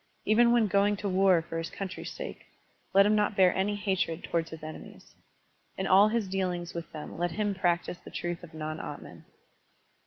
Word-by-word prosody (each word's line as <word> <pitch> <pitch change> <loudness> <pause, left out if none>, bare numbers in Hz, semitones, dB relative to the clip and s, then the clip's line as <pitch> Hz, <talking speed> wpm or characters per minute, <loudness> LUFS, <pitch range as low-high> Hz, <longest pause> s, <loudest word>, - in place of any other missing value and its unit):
Even 235 +3 +5
when 235 -2 +4
going 205 +1 +2
to 205 - -3
war 185 -3 +4
for 165 0 -5
his 165 - -4
country's 190 -2 -6
sake, - - -8 0.4
let 195 +1 +6
him 210 - +3
not 210 0 +1
bear 185 -2 +5
any 200 +2 0
hatred 190 -5 -1
towards 165 -1 -1
his 160 -1 -10
enemies. 155 0 -10 0.6
In 190 - -2
all 195 +2 +6
his 220 -2 0
dealings 180 -2 -2
with 170 -1 -6
them 155 +1 -8
let 175 0 +1
him 205 0 0
practise 175 -1 0
the - - -12
truth 175 0 -4
of 165 -2 -12
non 155 0 -4
atman. - - -9
190 Hz, 190 wpm, -29 LUFS, 170-205 Hz, 0.6 s, let